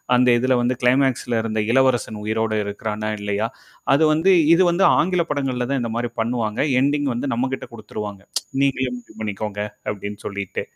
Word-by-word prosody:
அந்த 125 0 +4
இததுல 130 +1 +2
வந்து 125 +1 +1
கிளைமாக்ஸ்ல 125 -2 +2
இருந்த 110 -1 -1
இளவரசன் 120 -4 +2
உயிரோடு 110 0 0
இருக்கிறானா 105 +1 -4
இல்லயா? 105 +2 -1 0.5
அது 150 - +3
வந்து 170 +5 +4 0.2
இது 180 - +3
வந்து 185 +3 +3
ஆங்கில 180 0 +2
படங்கள்ல 130 -4 -1
தான் 135 -2 0
இந்த 115 - -3
மாரி 120 -1 -2
பண்ணுவாங்க, 115 -2 -1 0.3
எண்டிங் 145 0 +1
வந்து 130 +1 -2
நம்மகிட்ட 130 +2 -2
குடுத்துருவாங்க. 105 -2 -7 0.4
நீங்களே 130 -2 +1
முடிவு 115 -2 -17
பண்ணிக்கோங்க 105 -1 -4 0.3
அப்ப்டின்னு 105 0 -7
சொல்லிட்டு. 100 -2 -4
120 Hz, 155 wpm, -22 LUFS, 110-130 Hz, 0.5 s, அந்த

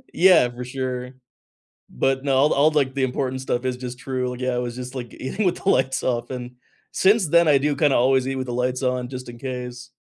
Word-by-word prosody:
Yeah, 180 -8 +6
for 125 +1 -7
sure. 125 -1 -4 0.8
But, 135 - 0
no, 135 -2 +1
all 145 +3 +4
all, 150 +3 +4
like, 140 -3 +1
the 135 - 0
important 130 0 -2
stuff 125 -1 -2
is 130 -1 0
just 125 0 -7
true. 125 -2 -3
Yeah, 130 0 -1
I 120 - -1
was 120 -1 -4
just, 125 +1 -7
like, 120 -2 -6
eating 195 +10 -3
with 180 - +1
the 195 - +2
lights 130 -5 +1
off 120 -1 -1
and 125 -1 -6 0.4
since 195 -2 +3
then, 170 +1 +5
I 145 -2 +6
do 145 +1 0
kinda 145 -1 +3
always 130 +1 +3
eat 135 - -2
with 130 -1 -4
the 120 - -4
lights 125 +2 -1
on 125 -1 0
just 130 -1 -7
in 120 - -10
case. 125 -1 -6
130 Hz, 235 wpm, -23 LUFS, 125-135 Hz, 0.8 s, Yeah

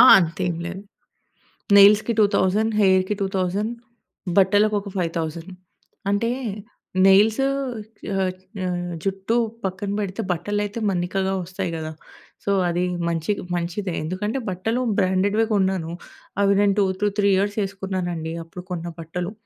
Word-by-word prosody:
ఆ! - - +11 0.2
అంతేం 170 0 -1
లేదు. 190 +3 -6 1.0
నెయిల్స్‌కి 210 +3 +7
2,000 210 +2 +3
హెయిర్‌కి 190 +1 +3
2000 195 +3 -1 0.7
బట్టలకు 205 +2 +4
ఒక 200 - -8
5,000 165 0 -3 0.6
అంటే 205 +3 +1 0.8
నెయిల్స్ 210 +5 +5 0.8
ఆహ్, 190 -1 +1 0.3
ఆహ్, 175 -1 -2
జుట్టు 195 +3 -1 0.3
పక్కన 190 +2 -3
బెడితే 200 +1 -3
బట్టలైతే 205 +4 -2
మన్నికగా 190 +1 -1
ఒస్తాయి 185 0 -4
గదా! 155 0 -4 0.5
సో, 200 - 0 0.2
అది 175 +1 0 0.3
మంచి 165 +3 -1 0.2
మంచిదే. 175 +2 -2
ఎందుకంటే, 210 +9 -2
బట్టలు 220 +7 -1 0.2
బ్రాండెడ్వే 195 +4 +2
గొన్నాను. 190 -4 +1 0.5
అవి 200 0 +4
నేను 205 -1 +4
2 200 - +4 0.2
టూ 205 - +4
3 200 - +4
ఇయర్స్ 205 +2 0
ఎసుకున్నానండి. 185 -4 -4
అప్పుడు 180 +2 -10
కొన్న 175 -1 -3
బట్టలు. 175 +3 -4
190 Hz, 120 wpm, -23 LUFS, 175-205 Hz, 1.0 s, ఆ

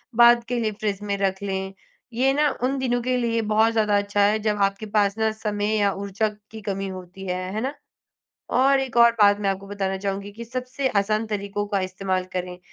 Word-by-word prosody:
बाद 235 0 +7
के 245 0 -1
लिए 220 -2 0
फ्रिज 205 -1 -3
में 200 -1 -1
रख 190 -1 -1
लें। 190 -1 -3 0.4
ये 260 +3 +3
ना 295 +1 +3
उन 270 +2 +1
दिनों 245 -2 0
के 255 +1 0
लिए 230 -1 0
बहुत 220 +1 +4
ज़्यादा 210 -2 +2
अच्छा 205 0 0
है, 210 +2 +3
जब 210 -1 0
आपके 195 +2 0
पास 205 0 +2
ना 220 0 +2
समय 210 -1 -2
या 200 -1 +3
ऊर्जा 200 +2 -1 0.2
की 220 -1 -8
कमी 195 -1 -3
होती 185 0 -8
है, 180 - -1 0.2
है 215 - -2
ना? 270 +3 -2 0.8
और 270 +2 +4
एक 260 -3 -3
और 235 0 +8
बात 205 0 +6
मैं 200 -1 0
आपको 195 +1 -4
बताना 195 -1 -2
चाहूँगी 195 +1 -4
कि 230 +3 -9
सबसे 255 +2 -3
आसान 215 +2 -1
तरीकों 205 0 -3
का 200 -1 0
इस्तेमाल 185 0 -2
करें। 180 0 -4
210 Hz, 210 wpm, -24 LUFS, 195-235 Hz, 0.8 s, और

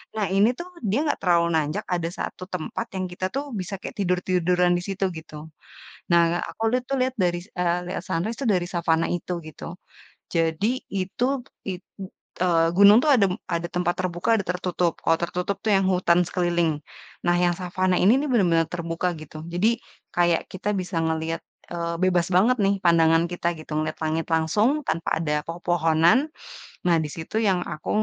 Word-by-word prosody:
Nah 215 -2 0
ini 205 +3 +5
tuh, 350 +1 -6 0.2
dia 215 +7 +2
nggak 295 - 0
terlalu 170 -2 +3
nanjak, 150 0 -1
ada 170 -2 -2
satu - - -5
tempat 180 +6 -3
yang 185 0 -1
kita 180 +1 -4
tuh 275 - 0 0.2
bisa 185 +2 -5
kayak - - -7
tidur-tiduran 180 -1 +2
di - - -3
situ 195 0 -1
gitu. 155 -1 -10 0.8
Nah 170 0 +4
aku - - -8
lihat 250 0 +1
tuh 275 - +1
lihat 255 0 +1
dari 175 -1 +1
se - - -22
eee, 175 0 +2
lihat - - -3
sunrise 205 +8 -2
itu 275 - -2
dari 180 -1 +1
savana 165 -1 +2
itu 175 +1 -3 0.2
gitu. 165 +2 -9 0.6
Jadi 165 +3 +1 0.3
itu 190 +5 -1 0.4
i - - -1 0.7
eee, 165 -2 +3
gunung 200 +2 +9
tuh 310 - +2
ada 210 -5 +4 0.3
ada 170 +1 -2
tempat 175 0 +1
terbuka 180 +1 -2
ada 200 - -3
tertutup. 180 -1 -1
Kalau 165 - +3
tertutup 180 +3 -2
tuh 215 - +3
yang 195 - +3
hutan 180 -1 +3
sekeliling. 175 -2 +1 0.5
Nah 175 0 +3
yang 175 0 +3
savana 185 0 0
ini 205 +7 +6
nih 300 - -2
benar-benar 170 -8 +3
terbuka 170 0 -2
gitu, 155 0 -10 0.2
jadi 185 +6 +3 0.5
kayak 175 -1 +3
kita 190 +2 -3
bisa 180 -1 -4
ngeliat, 160 0 -1 0.3
eee, 170 -1 -2
bebas 180 -2 +2
banget 230 +8 +4
nih 195 0 +3
pandangan 165 -1 +5
kita 175 -1 -2
gitu. 155 - -12
Ngeliat 155 0 -3
langit 160 +1 -1
langsung, 160 +8 +3 0.2
tanpa 165 +1 -1
ada 150 -2 -1
pepohonan. 165 +1 +3 0.7
Nah 175 -2 +4
di 150 - -4
situ 165 +5 -7
yang 185 -2 +2
aku, 155 -1 -6
175 Hz, 180 wpm, -24 LUFS, 165-190 Hz, 0.8 s, gunung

